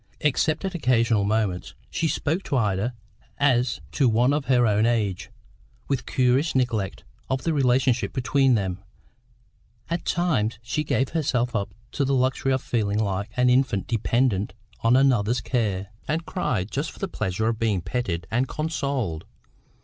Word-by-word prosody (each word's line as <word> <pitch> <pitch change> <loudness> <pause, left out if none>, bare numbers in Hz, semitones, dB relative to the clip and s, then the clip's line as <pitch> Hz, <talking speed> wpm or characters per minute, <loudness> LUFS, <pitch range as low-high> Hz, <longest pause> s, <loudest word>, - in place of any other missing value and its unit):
Except 150 +4 +1
at 190 - -2
occasional 120 - +2
moments, 105 -4 -1 0.2
she 165 - 0
spoke 160 +3 -1
to 135 - 0
Ida 105 +1 0 0.4
as 125 -4 +2
to 135 -5 +3
one 120 +5 +3
of 145 -1 -1
her 125 -2 +4
own 105 +1 +3
age, 105 -6 -1 0.6
with 135 -2 -2
curious 130 +5 +2
neglect 115 -7 -1 0.3
of 130 0 -1
the 165 - +1
relationship 125 -5 +2
between 130 +1 +2
them; 95 -3 -2 1.1
at 170 -1 -1
times 135 -11 0
she 140 +6 -1
gave 130 -3 0
herself 125 -6 0
up 100 -2 -2 0.2
to 140 - 0
the 135 0 +1
luxury 130 +1 +1
of 130 -1 0
feeling 105 -3 0
like 100 -1 -1
an 125 0 +4
infant 125 -7 +2
dependent 115 -3 0 0.2
on 115 +2 +3
another's 125 -4 +3
care; 100 -6 -1 0.2
and 160 +2 -1
cried 110 - -2
just 145 +4 -2
for - - -14
the 195 - -3
pleasure 110 - -2
of 115 -1 -2
being 110 -4 +1
petted 85 -4 -3
and 125 +4 +1
consoled. 140 - -2
125 Hz, 155 wpm, -25 LUFS, 105-135 Hz, 1.1 s, her